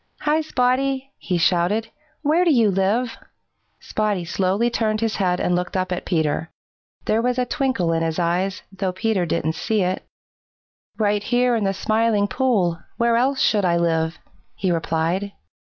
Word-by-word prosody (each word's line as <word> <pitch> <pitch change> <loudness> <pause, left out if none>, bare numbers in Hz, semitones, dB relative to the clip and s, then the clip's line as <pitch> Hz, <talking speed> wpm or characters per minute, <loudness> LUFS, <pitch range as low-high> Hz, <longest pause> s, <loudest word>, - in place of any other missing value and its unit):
"Hi, 305 +1 +2
Spotty!" 270 -1 0
he 180 - -1
shouted. 180 +6 +1 0.3
"Where 315 +4 +3
do 355 - +3
you 230 -7 +4
live?" 210 +6 0 0.6
Spotty 210 -5 -1
slowly 195 +7 0
turned 215 -2 0
his 225 -1 -1
head 180 -3 +1
and 180 - +1
looked 180 +1 -2
up 185 0 -1
at 180 - -3
Peter. 160 -1 0 0.6
There 220 +1 +2
was 250 +1 0
a 250 - +1
twinkle 245 - 0
in 165 - 0
his 165 -1 -1
eyes, 180 +3 0
though 195 -1 -2
Peter 190 -2 0
didn't 160 0 0
see 205 +5 0
it. 185 +1 -1 0.9
"Right 210 -1 +1
here 245 +3 +2
in 220 -3 0
the 195 - +2
Smiling 215 -1 +1
Pool. 205 -10 +1 0.2
Where 235 0 +2
else 260 +3 +1
should 210 -2 +3
I 170 -2 +2
live?" 165 -1 0 0.4
he 185 - -1
replied. 170 +4 -1
205 Hz, 165 wpm, -22 LUFS, 180-235 Hz, 0.9 s, you